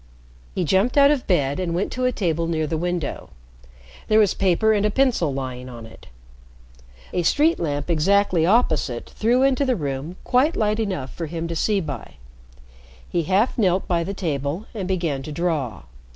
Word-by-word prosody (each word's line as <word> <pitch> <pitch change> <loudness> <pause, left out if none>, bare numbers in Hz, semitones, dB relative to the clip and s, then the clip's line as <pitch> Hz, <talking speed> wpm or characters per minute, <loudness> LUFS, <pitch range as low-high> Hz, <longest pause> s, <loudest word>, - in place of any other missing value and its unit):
He 185 - 0
jumped 190 - +2
out 280 0 +7
of 280 -4 -1
bed 145 -6 +1
and 170 -2 -2
went 185 - -1
to 255 0 -2
a 255 - +3
table 170 -7 -1
near 160 -2 0
the 155 - -2
window. 175 -1 -3 0.8
There 215 - +3
was 210 -3 +4
paper 195 +3 +2
and 205 -1 +1
a 210 - +3
pencil 230 - +1
lying 130 -2 -5
on 120 -2 -9
it. 110 - -15 1.1
A 180 - +1
street 300 - +2
lamp 145 -3 -2
exactly 180 +1 +2
opposite 160 - +1
threw 240 +4 +2
into 270 +1 +3
the 260 -2 +1
room 145 +1 -4
quite 270 +6 +2
light 215 0 +1
enough 185 -12 -3
for 165 - -5
him 165 +1 -4
to 170 - -3
see 205 +4 +1
by. 145 -8 -7 0.9
He 170 -2 -1
half 205 +7 +2
knelt 190 -3 +2
by 170 -2 +1
the 195 +4 -4
table 150 +2 -3
and 200 -5 -4
began 170 -7 -1
to 150 - -7
draw. 150 - -2
175 Hz, 180 wpm, -22 LUFS, 150-215 Hz, 1.1 s, out